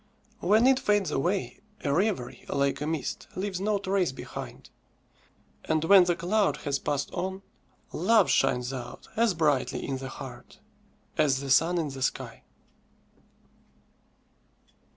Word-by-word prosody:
When 215 +6 +4
it 265 0 +5
fades 205 -5 +1
away, 180 +8 -1 0.2
a 140 -3 +1
reverie, 180 - -1
like 140 0 0
a 150 - -2
mist, 160 -3 -3
leaves 190 -1 -3
no 210 +1 +1
trace 190 -4 0
behind; 130 - -9 0.9
and 160 0 +1
when 185 +2 +7
the 175 -1 +1
cloud 195 +5 +1
has 140 -1 0
passed 145 -1 -2
on, 190 +1 -4 0.5
love 205 +4 +4
shines 125 -1 +1
out 125 -2 -8
as 225 -4 +2
brightly 145 -5 +1
in 135 - -2
the 135 0 -6
heart 130 -3 -10 0.6
as 140 -4 +3
the 140 -1 -4
sun 165 +6 +4
in 160 -3 -1
the 135 -1 -8
sky. 130 - -2
165 Hz, 135 wpm, -28 LUFS, 135-195 Hz, 0.9 s, when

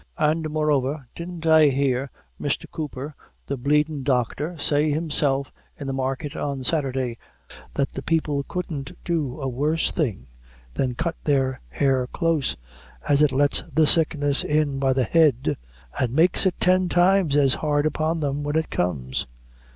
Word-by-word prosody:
And, 155 +1 +1
moreover, 150 -2 0
didn't 170 -1 -7
I 160 -1 +6
hear 135 -1 0 0.3
Misther 145 - -2
Cooper, 150 -1 -6 0.3
the 140 - -3
bleedin' 150 +3 +1
doctor, 140 +5 -1
say, 150 +1 +1
myself, 140 -4 0 0.3
in 140 - -6
the 135 - -2
market, 135 +2 -3
on 140 -2 -3
Sathurday, 130 -5 -1 0.6
that 140 -1 0
the - - -6
people 150 -2 0
couldn't 155 -7 -5
do 155 -7 -2
a 135 - -3
worse 150 +6 0
thing 115 - -2 0.5
than 125 - -1
cut 170 +6 -2
their 135 -3 +1
hair 135 -3 +1
close, 165 -1 0 0.5
as 145 0 +4
it 150 -2 +4
lets 145 +2 +3
the 155 +2 +4
sickness 145 -3 +3
in 150 -2 0
by 135 -1 +2
the 130 -1 +1
head, 145 -3 +3 0.4
and 125 -3 +1
makes 175 +4 +4
it 180 - -2
tin 185 0 +3
times 175 -3 +3
as 140 -3 +4
hard 145 -1 0
upon 155 +2 0
them, 145 0 -1
when 145 +1 -2
it 160 0 0
comes." 65 -8 -2
145 Hz, 155 wpm, -24 LUFS, 135-155 Hz, 0.6 s, I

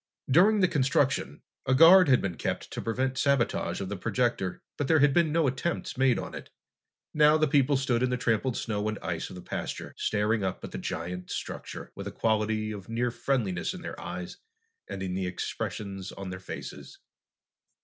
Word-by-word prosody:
During 200 +8 +5
the 185 - +5
construction, 135 - +1 0.2
a 130 - +4
guard 165 +3 +8
had 130 - +4
been 95 -3 -1
kept - - -4
to - - -4
prevent 130 +3 -1
sabotage 140 -4 +1
of 95 - -3
the 100 - -3
projector, 100 -1 -1
but 145 - -2
there 160 - +5
had 145 -1 +4
been 165 -1 +3
no 165 0 +2
attempts 135 +6 -2
made 130 -1 +3
on - - -5
it. - - -8 0.6
Now 150 0 +5
the 155 0 +3
people 140 0 +3
stood 125 -3 0
in 130 - +2
the 125 - 0
trampled 120 +1 0
snow 105 -2 -2
and 110 - -3
ice - - -3
of - - -9
the 90 - -9
pasture, - - -5
staring 105 0 +1
up 95 -1 -3
at - - -6
the - - -5
giant 90 +2 -5
structure, - - -6
with - - -7
a - - -4
quality 110 -1 0
of 100 -1 -8
near 120 +2 0
friendliness 115 -9 -1
in - - -9
their - - -7
eyes 90 0 -6 0.5
and 95 - -5
in 90 -1 -3
the 95 0 -1
expressions 95 +2 -4
of 95 -1 -7
their 90 - -6
faces. 95 - -8
120 Hz, 195 wpm, -28 LUFS, 100-140 Hz, 0.6 s, guard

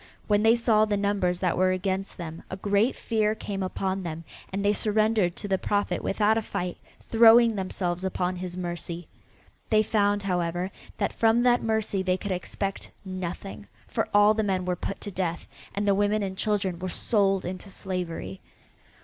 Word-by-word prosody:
When 205 0 +3
they 225 +2 +5
saw 225 -2 +3
the 210 -1 0
numbers 200 -3 0
that 180 -3 +1
were 185 0 +4
against 190 +1 -2
them 165 -1 -7
a - - -4
great 205 +5 +2
fear 215 -2 0
came 200 -2 -5
upon 190 +1 -2
them 165 -2 -5 0.3
and 195 +1 -2
they 205 - +4
surrendered 215 -4 +2
to 205 - -6
the 190 -1 +1
Prophet 205 0 -1
without 215 +2 +2
a - - -3
fight, 180 -4 -4 0.2
throwing 230 0 +6
themselves 185 -2 -2
upon 185 -1 -1
his 180 0 -5
mercy. 175 -1 -5 0.6
They 215 0 +4
found, 205 -1 +1
however, 180 0 -1 0.3
that - - -1
from 225 +1 +3
that 245 0 +4
mercy 220 -3 0
they 185 -1 +1
could 200 +1 -5
expect 195 +2 -3 0.2
nothing, 185 +2 -6 0.2
for - - -2
all 205 +1 +6
the 220 - 0
men 190 -3 0
were 180 0 0
put 195 +2 -5
to 205 - -5
death, 180 -3 -3 0.3
and 205 +1 -1
the 200 - +5
women 205 +1 +1
and 190 -1 -3
children 195 -4 -1
were 185 0 -3
sold 195 -1 +1
into 185 +3 -6
slavery. 175 - -4
195 Hz, 180 wpm, -27 LUFS, 185-210 Hz, 0.6 s, throwing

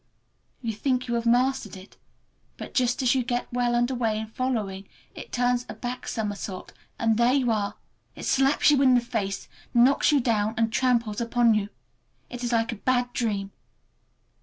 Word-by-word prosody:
You 225 -1 -2
think 255 +3 -1
you 240 - -2
have 235 0 -1
mastered 255 -2 +1
it, 185 +1 -14 0.6
but - - -8
just 250 0 +1
as 250 +1 +4
you 260 -2 +1
get 245 0 -2
well 245 -1 +1
under 240 +2 +1
way 225 -3 0
in 220 - -3
following, 215 -5 -3 0.2
it - - -10
turns 245 0 +1
a - - -6
back 245 0 -6
somersault 205 -4 -4 0.2
and 225 -1 +1
there 240 +2 +4
you 260 -4 +2
are. 205 -2 -1 0.4
It - - -7
slaps 270 +2 +3
you 280 -2 +3
in 260 -2 +5
the - - +5
face, 225 -5 -3 0.3
knocks 250 +6 +5
you 290 - +4
down, 220 -3 0
and 225 -1 +1
tramples 235 -3 +1
upon 235 0 +3
you. 210 -1 0 0.6
It 245 0 -6
is 240 - -1
like 230 0 +1
a 230 - -6
bad 245 +2 0
dream. 200 -4 -2
240 Hz, 185 wpm, -26 LUFS, 220-250 Hz, 0.6 s, in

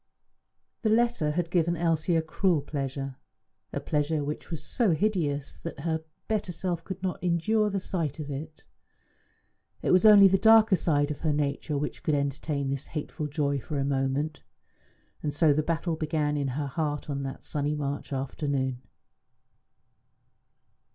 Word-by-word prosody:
The 220 - +1
letter 230 -8 +2
had 170 +1 -1
given 170 -1 +2
Elsie 165 0 +1
a 165 - +2
cruel 165 0 +1
pleasure 135 -2 -4 0.5
a - - -2
pleasure 150 0 0
which 150 +1 -5
was 165 -4 -5
so 225 - +1
hideous 155 -6 -1
that 165 -4 -7
her 160 0 -1 0.2
better 210 -4 -1
self 175 0 -3
could 190 +1 -7
not 185 -1 -3
endure 210 +5 +2
the 200 -1 -1
sight 165 -6 -3
of 145 -1 -5
it. 155 +3 -7 1.2
It - - +2
was 185 - +5
only 205 -2 +9
the 195 0 +3
darker 220 -2 +7
side 145 -4 +1
of 150 - -5
her 160 - +1
nature 145 0 -1
which 145 +1 -3
could 155 - +1
entertain 140 0 -1
this 140 0 -4
hateful 150 0 -4
joy 140 -1 0
for 145 +3 -5
a 135 - 0
moment. 140 +2 -1 0.8
And 150 - -1
so 145 +1 +4
the 155 - +2
battle 165 +1 -1
began 155 -1 0
in 140 -2 0
her 150 - -1
heart 145 +1 -2
on 140 -2 -2
that 135 0 -6
sunny 150 0 -1
March 145 -1 -3
afternoon. 135 -1 -2
155 Hz, 160 wpm, -28 LUFS, 145-175 Hz, 1.2 s, only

